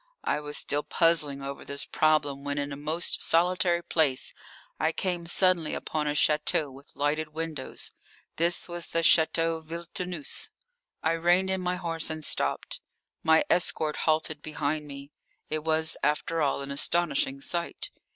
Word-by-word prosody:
I - - 0
was 150 0 0
still 145 +1 -1
puzzling 150 -5 +2
over 140 0 -6
this 140 0 -2
problem 145 -3 +1
when 145 0 -3
in 145 0 -2
a - - -4
most 155 +4 0
solitary 175 0 +2
place 155 -6 0 0.5
I 160 - +2
came 175 -1 -3
suddenly 175 -3 +3
upon 150 -1 -3
a 145 - 0
château 150 -1 +2
with 140 +2 -16
lighted 150 +2 0
windows. 160 -4 -5 0.5
This 170 +2 +2
was 175 -1 -1
the 165 - 0
Château 165 0 +3
Villetaneuse. 170 0 -4 0.5
I 160 - +2
reined 175 +3 +2
in 190 -1 -1
my 180 0 -1
horse 165 -2 -2
and 155 -1 -3
stopped. - - -1 0.4
My 160 0 +4
escort 160 -3 +2
halted 155 -1 0
behind 150 0 -3
me. 140 0 -10 0.4
It 155 0 -2
was, 160 0 +2
after 150 +3 0
all, 140 -1 +1
an 140 - -6
astonishing 140 -2 +1
sight. 170 +4 -3
155 Hz, 150 wpm, -28 LUFS, 145-170 Hz, 0.5 s, My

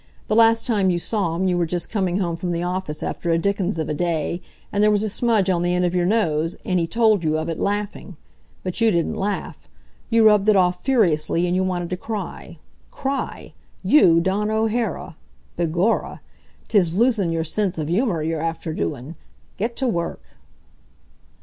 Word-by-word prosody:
The 215 - +2
last 225 0 +5
time 205 -6 +2
you 175 - +1
saw 175 -2 -1
him 190 +2 0
you 180 - +1
were 170 - +1
just 175 +1 -3
coming 190 -4 0
home 175 -4 -1
from 175 +1 -4
the 170 +1 -2
office 180 -4 -3
after 170 - -3
a 165 - +3
dickens 195 0 -1
of 160 -2 -2
a - - -2
day, 170 +1 -1 0.3
and 205 +1 +2
there 210 - +5
was 210 0 +2
a - - 0
smudge 220 -2 +1
on 180 -2 +1
the 175 0 +1
end 180 0 +1
of 175 - 0
your 175 -1 +1
nose, 165 -6 0
and 185 -1 +1
he 165 - 0
told 220 -2 +2
you 155 0 +1
of 160 +1 -3
it, 165 - -4
laughing. 205 -3 -3 0.5
But 185 +4 -4
you 225 - +5
didn't 170 -5 0
laugh. 200 +1 -4 0.4
You 230 -1 +4
rubbed 210 -1 +5
it 215 - +5
off, 180 -1 +2
furiously, 175 - +2
and 175 0 0
you 185 - +1
wanted 180 -2 -2
to 180 - -1
cry. 215 +1 -6 0.3
Cry! 275 0 -4 0.3
You, 170 - +5
Dawn 195 +4 0
O'Hara! 220 -6 -1 0.4
Begorra! 175 +6 0 0.5
'Tis 180 -6 +2
losin' 225 -7 +2
your 165 -1 -1
sense 190 +3 -1
av 155 -2 -3
humor 180 -2 0
you're 160 0 -2
after 165 -1 -3
doin'! 145 0 -4 0.5
Get 230 +4 -2
to 265 - -1
work." 170 -7 -2
185 Hz, 195 wpm, -22 LUFS, 170-210 Hz, 0.5 s, last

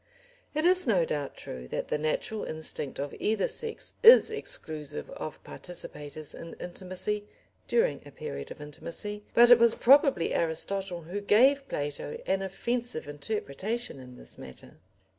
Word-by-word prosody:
It 310 +2 +1
is 365 -3 +4
no 185 -7 +3
doubt 145 -3 -3
true 65 0 -8
that - - -4
the 150 - 0
natural 155 +8 -1
instinct 155 -3 -3
of 140 0 -3
either 215 -2 +1
sex 455 -1 -3
is 470 -1 +9
exclusive 155 - -3
of 155 - -7
participators 150 -4 -5
in 165 - -9
intimacy 185 +3 -3 0.4
during 475 +1 +2
a - - -12
period 460 - -6
of - - -9
intimacy, 170 +8 -5
but 240 +1 +8
it 245 - +10
was 235 -1 +5
probably 275 - +5
Aristotle 175 +2 -1
who 185 +6 -5
gave 265 +7 +4
Plato 145 0 -3
an 195 0 +1
offensive 235 -1 -3
interpretation 190 - -3
in 125 -1 -12
this - - -10
matter. 65 +4 -11
190 Hz, 145 wpm, -29 LUFS, 150-235 Hz, 0.4 s, it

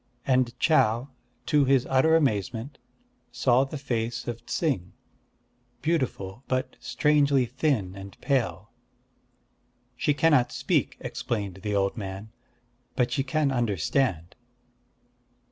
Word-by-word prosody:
And 125 -2 +1
Chau, 125 -5 +3 0.4
to 150 -2 +3
his 135 -1 +3
utter 135 +5 +4
amazement, 120 - -1 0.5
saw 125 +2 +3
the 145 +3 -6
face 120 -4 -3
of 120 -1 -5
Ts'ing, 130 - -1 0.9
beautiful, 125 - -1
but 130 0 -1
strangely 145 -3 +2
thin 125 - -1
and 100 0 -10
pale. 135 -5 -1 1.2
"She 145 +4 +1
cannot 145 -3 +3
speak," - - 0
explained 100 -5 -3
the 105 -1 -2
old 100 +3 0
man; 100 +1 -6 0.6
"but 125 -1 +1
she 140 - +1
can 145 +1 0
understand." 100 - 0
125 Hz, 110 wpm, -26 LUFS, 105-140 Hz, 1.2 s, utter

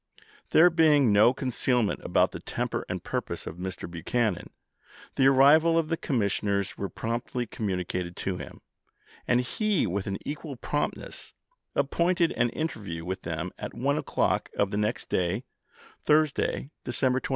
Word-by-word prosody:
There 175 +2 +6
being 150 -8 +4
no 110 +4 +6
concealment 125 -3 0
about - - +2
the - - -7
temper - - -3
and - - -4
purpose - - -4
of 85 - -7
Mr. 95 +1 -5
Buchanan, 90 +3 -1 0.6
the 135 - +4
arrival 150 +5 +6
of 160 -2 +1
the 165 - +1
commissioners 100 - -1
was 100 - -4
promptly 120 +2 -2
com 110 -1 -4
municated 90 -1 -3
to 95 -2 -3
him, - - -9 0.7
and 125 0 +3
he 205 - 0
with 100 +1 -2
an 100 0 -2
equal 145 -1 -5
prompt 145 +4 -2
ness - - -10 0.4
appointed 170 0 +2
an 120 0 +1
interview 100 - -4
with 95 +1 -4
them 80 +2 -4
at - - -6
1 - - +1
o'clock - - 0
of 100 -1 +1
the 100 - -1
next 105 +3 -1
day, 95 +6 0 0.6
Thursday, 150 -2 +1
December 130 +1 +1
27. - - -6
120 Hz, 155 wpm, -27 LUFS, 95-145 Hz, 0.7 s, There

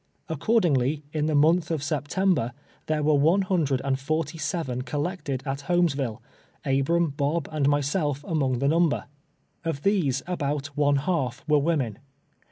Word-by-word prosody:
Accord 215 +9 +2
ingly, 145 -1 +1
in 155 -1 0
the 155 - +1
month 160 +3 +4
of 160 -4 -1
September, 145 -2 0 0.3
there 155 -1 0
were 155 +1 +3
one 160 +7 +4
hundred 155 -9 +1
and 135 -1 0
forty 155 +3 -2
seven 145 -4 -2
collected 145 -1 -3
at 140 0 -4
llolmesville, 140 -11 +1 0.4
Ahram, 140 +3 +1
Bob 145 +2 0
and 145 -3 +1
myself 145 0 0
among 135 -6 +1
the 140 +3 0
number. 165 +1 +2 0.6
Of 160 -4 -3
these 185 -10 +1
about 145 -4 -3
one 145 -1 +3
half 135 -4 -1
were 150 -1 +4
women. 140 -8 0
150 Hz, 150 wpm, -26 LUFS, 140-165 Hz, 0.6 s, month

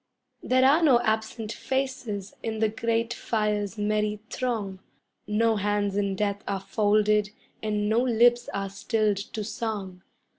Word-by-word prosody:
] 255 -1 -50
There 255 0 +5
are 290 +5 +5
no 270 -7 +6
absent 220 0 -1
faces 260 -7 -3
in 220 -1 -3
the 220 0 +2
grate 230 +1 -1
fire's 210 -3 -1
merry 210 0 0
throng; 215 -7 -2 0.5
No 220 +1 +2
hands 205 0 0
in 200 -1 0
death 205 0 -1
are 195 -1 -1
folded, 210 0 +2 0.3
and 210 -1 -1
no 220 +2 +3
lips 240 0 +3
are 195 0 -3
stilled 210 0 0
to 210 +2 -5
song. 205 -4 -4
215 Hz, 145 wpm, -26 LUFS, 205-230 Hz, 0.5 s, no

